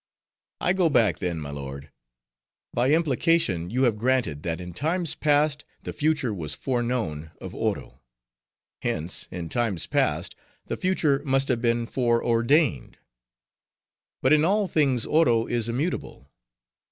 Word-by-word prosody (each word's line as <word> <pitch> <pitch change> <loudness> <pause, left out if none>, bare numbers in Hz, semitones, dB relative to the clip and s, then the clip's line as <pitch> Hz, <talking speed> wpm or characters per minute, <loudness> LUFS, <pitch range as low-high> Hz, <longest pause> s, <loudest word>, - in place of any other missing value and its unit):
"I 180 - +2
go 185 -3 +2
back 110 - +2
then, 90 -2 -2
my 75 -2 -6
lord. 70 0 -7 0.8
By 120 +2 +2
implication, 145 - +2
you 125 +5 0
have 115 -4 +2
granted, 120 - 0
that 85 0 -3
in 90 -1 -8
times 165 - 0
past 150 0 +1 0.2
the - - -5
future 150 -6 0
was 80 -7 -3
foreknown 120 - -2
of - - -8
Oro; 65 - -3 0.8
hence, 80 +3 -1
in 85 -2 -5
times 105 -3 0
past, - - 0 0.3
the - - -3
future 155 -7 +1
must 135 -1 +1
have 120 -3 +1
been 120 -1 +1
foreordained. 120 - +1 1.3
But 130 - +5
in 155 0 +4
all 200 +5 +2
things 140 -9 +1
Oro 120 -8 +3
is 120 -1 -1
immutable. 120 - -4
120 Hz, 135 wpm, -25 LUFS, 90-150 Hz, 1.3 s, But